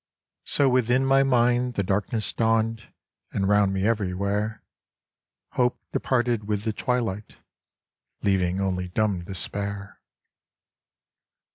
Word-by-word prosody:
So 140 - +3
within 125 0 +2
my 135 0 +4
mind 125 -1 +2
the 100 - 0
darkness 105 +3 0
dawned 115 0 0 0.4
and 95 -1 0
round 105 -1 +3
me 95 0 -1
everywhere 105 0 -1 0.9
Hope 125 0 0
departed 120 -4 0
with 105 -1 -1
the 110 -1 -1
twilight, 110 -4 -2 0.9
leaving 95 -2 +1
only 90 -2 -1
dumb 95 -1 0
despair. 100 +2 -5
105 Hz, 105 wpm, -25 LUFS, 100-120 Hz, 0.9 s, my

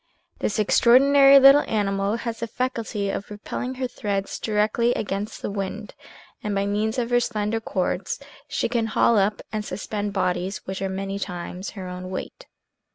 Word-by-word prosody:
This 210 - -1
ex 210 -2 +3
traordinary 275 +3 +7
little 275 +2 +8
animal 200 -1 0
has 230 -1 -4
the 230 - -3
faculty 225 -4 -2
of 200 - -4
propelling 230 +5 -5
her 255 0 -2
threads 200 -5 -3
directly 220 +3 +1
against 200 +1 -4
the - - -2
wind, 200 +1 -5 0.5
and 210 -1 -2
by 195 0 +1
means 210 +3 -1
of 240 -1 -1
her 245 - +5
slender 220 -2 -1
cords 185 -4 -2 0.3
she - - -1
can 230 -1 0
haul 220 0 +3
up 205 +2 0
and 215 -1 -2
suspend 205 +1 -4
bodies 185 0 -1
which 190 0 -5
are 195 - -1
many 195 +1 -4
times 180 +1 -5
her 185 -1 -5
own 180 0 -6
weight. 190 - -7
210 Hz, 170 wpm, -24 LUFS, 195-235 Hz, 0.5 s, little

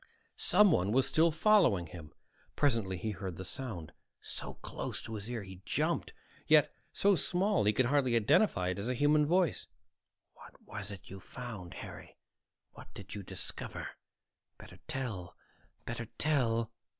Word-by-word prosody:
Someone 160 - +5
was 130 +2 +4
still 165 +1 +4
following 165 - +4
him. 80 -1 -10 0.4
Presently 115 -10 +1
he 110 +5 -3
heard 95 -3 -5
the 95 - -7
sound, 90 -7 -6 0.3
so - - -6
close - - -5
to 115 - -6
his 105 +1 -5
ear 120 -3 -3
he 95 -1 -11
jumped, - - 0 0.4
yet - - +5 0.2
so 200 0 +3
small 185 - +2
he 105 - +5
could 120 +4 +2
hardly 130 -2 +2
identify 105 - +3
it 95 - -2
as 105 +5 -3
a 125 - 0
human 150 +3 +4
voice. 180 0 +2 0.7
"What - - -15
was 100 -1 -6
it 100 -3 -9
you 95 - -7
found, 105 -5 -8
Harry? - - -9 0.5
What - - -14
did 100 - -9
you 105 - -5
discover? 95 - -5 0.7
Better 90 - -13
tell, 125 - -4 0.5
better 115 -1 -4
tell." 115 -7 +1
115 Hz, 150 wpm, -32 LUFS, 95-145 Hz, 0.7 s, Someone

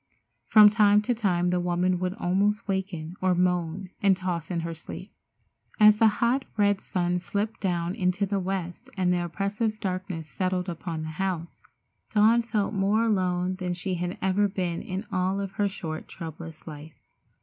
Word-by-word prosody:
From 210 -1 +8
time 210 -1 +5
to 245 - +1
time 180 -6 +1
the 180 - +1
woman 175 +1 +1
would 185 +1 -2
almost 205 +4 0
waken 185 -4 -3
or 185 -1 +3
moan 180 +1 0
and 195 -2 +4
toss 180 -3 -3
in 170 -2 -1
her 165 0 -4
sleep. 160 - -9 0.7
As 210 0 +7
the 225 0 +6
hot, 235 +5 +1
red 205 -1 +3
sun 180 -1 -1
slipped 200 +5 -3
down 175 -2 -1
in 180 -2 +1
the 195 +2 0
west 190 +5 -4
and 180 -1 +2
the 175 -1 0
oppressive 205 +5 -2
darkness 185 -4 -4
settled 185 +2 -2
upon 165 -1 -4
the 155 - -5
house, 180 -3 -3 0.5
Dawn 220 +3 +5
felt 220 -3 -1
more 205 +3 +2
alone 185 -4 0
than 180 -1 -2
she 185 +2 -3
had 180 +1 -3
ever 195 +2 +3
been 180 -3 -2
in 190 +4 -5
all 185 +1 0
of 195 -1 -3
her 205 0 0
short, 160 -5 -6
troublous 160 -1 -9
life. 155 0 -10
185 Hz, 170 wpm, -27 LUFS, 175-205 Hz, 0.7 s, From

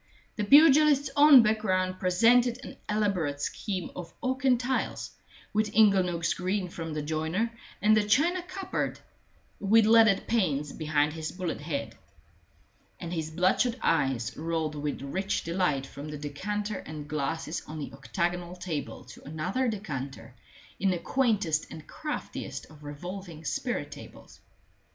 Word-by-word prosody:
The 210 - -1
pugilist's 290 +3 +6
own 285 -4 +9
background 185 -4 0
presented 235 +7 +4
an - - -9
elaborate 195 -9 0
scheme 185 +4 -3
of 175 -2 -7
oak 260 +1 -1
and 255 -3 +4
tiles, 255 +1 -2 0.4
with 210 0 +1
inglenooks 185 -6 +3
green 185 +1 -2
from 165 -2 -6
the 150 - -2
joiner, 160 +9 -1 0.3
and 215 +1 +6
a 215 - +3
china 315 - +2
cupboard 370 +2 -4 0.6
with 215 +2 +4
leaded 220 -3 +5
panes 150 -11 0
behind 150 -2 0
his 160 -1 -5
bullet 180 -5 -4
head. 140 -8 -4 1.0
And 170 0 -5
his 160 -2 -3
bloodshot 185 +9 +2
eyes 135 -7 +1
rolled 160 -1 -2
with 145 -2 -4
rich 190 +8 -2
delight 165 -6 0
from 140 +2 -9
the 150 - -5
decanter 205 +8 -4
and 150 -1 -8
glasses 155 +2 -3
on 155 - -7
the 145 - -6
octagonal 175 +5 -3
table 175 -5 -5
to - - -14
another 160 - -2
decanter 135 - -5 0.5
in 195 - +2
the 180 - +1
quaintest 205 - 0
and 155 - -10
craftiest 310 -1 -5
of 150 -1 -15
revolving 165 +2 -8
spirit - - -2
tables. - - -12
180 Hz, 140 wpm, -28 LUFS, 155-215 Hz, 1.0 s, own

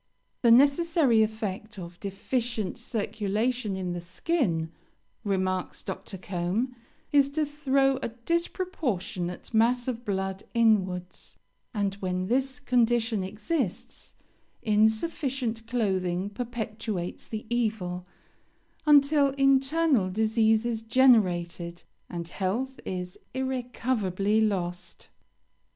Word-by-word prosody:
'The 235 - +4
necessary 280 0 +5
effect 215 -1 -3
of 175 -1 -9
deficient 215 +2 -2
circulation 220 -1 -1
in 185 -2 -3
the 175 - -4
skin,' 175 - -1 0.5
remarks 185 -2 -1
Dr. 190 +1 -6
Combe, 190 +8 -2 0.4
'is 280 -2 +5
to 305 +2 0
throw 275 -2 +2
a 260 - -3
disproportionate 235 - -2
mass 240 +3 +3
of 240 -2 -3
blood 190 -2 -2
inwards; 190 -6 +1 0.3
and 200 -4 -1
when 185 -1 -1
this 265 +6 0
condition 235 -5 +2
exists, 215 - -3 0.5
insufficient 225 +2 +1
clothing 190 -5 0
perpetuates 220 -5 -4
the 220 -1 -5
evil, 200 -7 -1 0.8
until 290 -1 +6
internal 275 - +3
disease 220 +2 +2
is 230 -2 -1
generated, 180 -8 +2 0.3
and 170 -1 -5
health 230 +9 -2
is 180 -1 -5 0.2
irrecoverably 240 -6 0
lost.' 180 -4 -2
220 Hz, 95 wpm, -27 LUFS, 190-255 Hz, 0.8 s, until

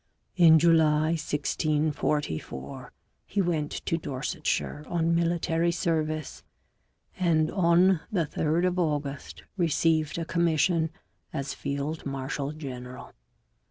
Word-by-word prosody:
In 165 -3 +7
July 155 -1 +4
1644 150 - -2 0.4
he 205 - -2
went 165 -5 0
to 165 - 0
Dorsetshire 150 +1 -3
on 170 -1 +1
military 170 0 +1
service, 155 -2 -2 0.8
and 160 -3 +2
on 180 0 +4
the 180 -6 +1
3rd 160 +3 0
of 180 0 0
August 140 - -3
received 160 -2 +1
a 165 - -2
commission 165 0 +2 0.4
as 140 -3 -3
field 140 +3 -4
marshal 135 +1 -3
general. 130 -4 -8
155 Hz, 100 wpm, -27 LUFS, 145-170 Hz, 0.8 s, In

